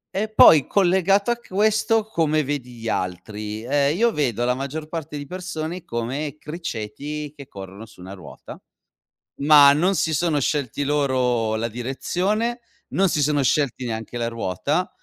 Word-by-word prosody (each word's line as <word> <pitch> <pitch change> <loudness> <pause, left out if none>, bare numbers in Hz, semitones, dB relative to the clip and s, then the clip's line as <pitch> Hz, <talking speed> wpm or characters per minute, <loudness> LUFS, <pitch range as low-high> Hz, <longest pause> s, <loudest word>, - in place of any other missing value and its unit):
E 215 +2 -1
poi 155 -9 +7
collegato 195 +3 +2
a 240 - 0
questo, 215 +1 +1
come 155 -7 0
vedi 140 -3 -4
gli 115 -1 -8
altri: 105 +4 -4
ehm, 140 +4 +1
io 235 +1 +3
vedo 120 - -1
la 125 - +2
maggior 140 +4 -5
parte 155 -2 -6
di 145 - -6
persone 180 -1 -5
come 135 +6 -4
criceti 150 -1 -6
che 140 -2 -11
corrono 100 +3 -10
su 100 - -19
una 95 +2 -9
ruota, 90 - -12 0.8
ma 145 -1 +7
non 180 +6 +2
si 160 -1 0
sono 160 -1 +1
scelti 145 0 -1
loro 125 -6 +1
la 115 +1 -1
direzione, 185 - -2 0.3
non 195 0 +2
si 150 -3 0
sono 145 -1 +1
scelti 130 -2 0
neanche 115 +1 -5
la 115 0 -1
ruota 105 -7 -2
145 Hz, 155 wpm, -22 LUFS, 120-170 Hz, 0.8 s, poi